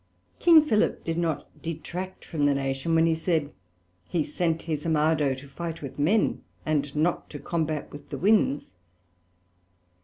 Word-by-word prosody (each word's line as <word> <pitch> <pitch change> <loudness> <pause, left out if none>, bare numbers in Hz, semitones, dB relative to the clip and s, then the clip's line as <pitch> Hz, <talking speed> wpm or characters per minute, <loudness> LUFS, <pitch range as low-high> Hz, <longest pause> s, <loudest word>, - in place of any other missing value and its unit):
King 330 -3 +7
Philip 220 -7 +1
did 165 0 -2
not 160 -4 -1
detract 180 +3 -6
from 150 -4 0
the 140 - +3
Nation, 135 +4 -1
when 165 0 +5
he 165 - +3
said, 160 -2 0 0.6
he 165 -3 +1
sent 165 -1 -1
his 155 -3 -3
Armado 155 -3 +2
to 135 +2 -11
fight 165 +2 -6
with 140 +1 -7
men, 195 +10 +2 0.2
and 145 -2 0
not 165 +3 0
to 150 - -7
combate 155 -1 -2
with 145 - -11
the - - -4
Winds. 195 - +2
160 Hz, 155 wpm, -27 LUFS, 145-170 Hz, 0.6 s, King